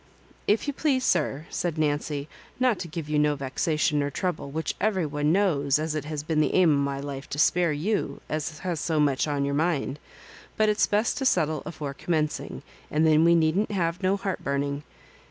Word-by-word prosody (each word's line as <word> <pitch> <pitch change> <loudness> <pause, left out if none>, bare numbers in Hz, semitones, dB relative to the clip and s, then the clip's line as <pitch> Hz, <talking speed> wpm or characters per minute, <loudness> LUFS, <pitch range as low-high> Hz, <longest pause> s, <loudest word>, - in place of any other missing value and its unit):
" - - -30
If - - -9
you 285 - -2
please, 270 -3 +1
sir," 155 -3 +1
said 170 -3 -2
Nancy, 145 -1 -1 0.3
"not 250 -5 +2
to 175 - -5
give 160 -1 -6
you 150 0 +1
no 150 0 +3
vexation 150 +3 0
nor 145 0 0
trouble, 170 0 -3
which 160 +3 -2
every 195 -5 +1
one 145 0 0
knows 150 -8 +2
as 155 0 -2
it 155 -2 -3
has 150 -1 -4
been 155 0 +1
the - - +1
aim 180 -4 +5
o' 140 - +2
my 140 0 -2
life 140 -1 -6
to - - -4
spare 170 +3 +3
you, 180 +9 -1
as 155 0 -3
has 180 -4 -2
so 160 0 0
much 145 -1 +2
on 145 -1 0
your 140 - -1
mind. 150 -2 0 0.6
But 215 0 +3
it's 210 0 +3
best 210 +6 +1
to 270 - -2
settle 155 - +1
afore 145 -4 -5
commencing, 155 0 -2 0.3
and 155 +2 +2
then 155 0 +5
we 170 +1 +5
needn't 165 +6 +2
have 180 -3 -1
no 190 +1 +2
heartburning. 140 -7 -2
155 Hz, 205 wpm, -26 LUFS, 145-180 Hz, 0.6 s, aim